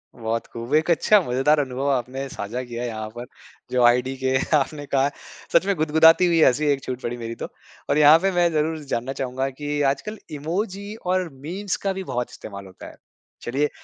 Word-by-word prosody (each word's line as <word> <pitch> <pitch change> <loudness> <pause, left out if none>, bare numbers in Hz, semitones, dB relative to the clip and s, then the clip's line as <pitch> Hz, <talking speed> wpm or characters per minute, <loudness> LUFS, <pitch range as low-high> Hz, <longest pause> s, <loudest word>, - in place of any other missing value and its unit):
बहुत 115 -1 -3
खूब 115 +4 -6
एक 160 +3 +2
अच्छा 210 +5 +5
मज़ेदार 135 +5 +3
अनुभव 135 0 -1
आपने 130 +1 -2
साझा 120 +2 -5
किया 120 0 -6
यहाँ 110 -2 -4
पर 120 +2 -8 0.5
जो 125 -1 +2
आईडीके 130 +2 +2 0.2
आपने 145 +1 -1
कहा। 140 0 +1 0.4
सच - - +5
में 200 - +1
गुदगुदाती 160 +2 +5
हुई 165 -1 +3
हँसी 145 +4 +3
एक 135 -1 0
छूट 130 0 -5
पड़ी 120 +1 -4
मेरी 115 0 -6
तो। - - -5 0.4
और - - +2
यहाँ 150 +1 +8
पे 195 +2 +1
मैं 175 -1 +3
ज़रूर 155 +1 0
जानना 130 0 -2
चाहूँगा 130 +1 -2
कि 145 +2 -3
आजकल 210 +11 -6 0.2
इमोजी 195 +7 -3
और 185 -1 0
मीम्स 180 +9 -4
का 195 - +1
भी 190 - -5
बहुत 125 -8 -3
इस्तेमाल 100 -2 -9
होता 95 - -12
है। - - -12 0.5
चलिए 140 +5 0
140 Hz, 190 wpm, -23 LUFS, 125-160 Hz, 0.5 s, यहाँ